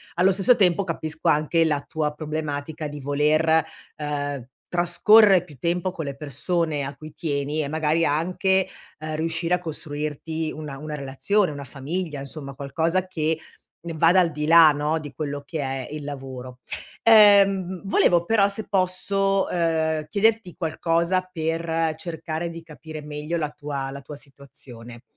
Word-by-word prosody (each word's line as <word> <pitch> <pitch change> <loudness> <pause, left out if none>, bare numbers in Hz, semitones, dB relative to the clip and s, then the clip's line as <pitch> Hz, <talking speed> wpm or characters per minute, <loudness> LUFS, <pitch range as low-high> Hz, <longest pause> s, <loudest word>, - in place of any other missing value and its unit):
Allo 185 +3 +4
stesso 195 +6 +4
tempo 195 -3 +3
capisco 160 -2 -2
anche 155 +2 +3
la 145 -3 +1
tua 155 -2 -2
problematica 155 0 -4
di 145 0 -7
voler, 155 +3 +2 0.3
uhm, 145 -3 -3 0.2
trascorre 180 +2 +5
più 155 -5 -15
tempo 175 +5 -1
con 160 -4 -6
le 140 -1 -5
persone 150 +1 -1
a 140 +1 -5
cui 155 +1 -11
tieni, 145 0 -2
e 140 - -3
magari 160 +2 +1
anche, 185 +5 +1 0.3
uhm, 155 0 -4
riuscire 165 +2 0
a - - -4
costruirti 155 0 -4
una 150 -3 -7
una 150 +1 -7
relazione, 150 +8 0
una 145 -1 -7
famiglia, 145 +4 -4
insomma 140 0 -4
qualcosa 165 +7 -1
che 160 -2 -1 0.5
ne 165 - -4
vada 170 +4 +5
al 170 -3 +3
di 150 0 -3
là, 165 -1 +8
no, 150 +2 -1
di 145 -2 -9
quello 145 -2 -4
che 160 0 -5
è 135 -1 -3
il 150 -1 -6
lavoro. 130 -3 -7 0.5
Ehm, 195 -4 +6
volevo 175 -3 +3
però 205 0 +4
se 200 +1 -2
posso, 195 +1 +1
uhm, 160 -2 0
chiederti 215 -1 +1
qualcosa 170 +2 0
per 165 -1 -1
cercare 160 0 -4
di 165 0 -9
capire 155 -1 -9
meglio 150 +3 -4
la 150 -2 -2
tua 140 -2 -5
la 140 +1 -8
tua 145 +2 -9
situazione. 125 -4 -11
160 Hz, 155 wpm, -24 LUFS, 145-175 Hz, 0.5 s, là